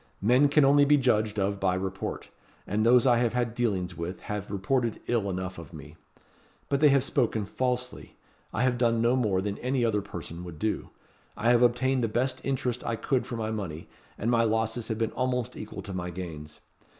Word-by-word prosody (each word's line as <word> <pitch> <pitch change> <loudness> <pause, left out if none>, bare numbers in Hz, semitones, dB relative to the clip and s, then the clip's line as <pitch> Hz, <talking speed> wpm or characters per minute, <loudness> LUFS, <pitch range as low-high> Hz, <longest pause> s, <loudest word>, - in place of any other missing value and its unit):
Men 125 +6 +5
can 150 0 +5
only 145 +1 +6
be 145 +1 +5
judged 110 -5 +1
of 100 0 0
by 95 -1 +1
report; 95 +1 -4 0.4
and 105 +2 0
those 120 +2 +5
I 120 -2 +5
have 120 0 +1
had 120 -2 0
dealings 95 -7 -1
with 85 +2 -5
have 105 -1 -5
reported 115 +4 0
ill 110 -5 0
enough 95 -1 -4
of 80 -4 -11
me. 75 0 -10 0.7
But 140 - +1
they 150 0 +6
have 140 -2 +4
spoken 115 -6 0
falsely. 125 +3 -3 0.4
I 115 - 0
have 125 -2 +1
done 115 -2 +2
no 120 +2 +3
more 105 -7 +1
than 100 0 -3
any 125 -1 0
other 105 -3 +1
person 90 -3 -8
would 85 -3 -8
do. 110 +6 -2 0.5
I 115 +3 +3
have 120 -1 +4
obtained 125 +1 +2
the - - +2
best 125 +4 -1
interest 125 -3 -2
I 115 - -1
could 130 +2 -1
for 120 - -4
my 110 -1 -2
money; 90 -7 -5 0.3
and 115 +3 0
my 115 -1 +4
losses 110 +1 0
have 110 - -2
been 115 -1 -1
almost 125 -2 -1
equal 105 - -7
to 100 - -7
my 90 -1 -3
gains. 80 -4 -8
115 Hz, 205 wpm, -28 LUFS, 95-125 Hz, 0.7 s, only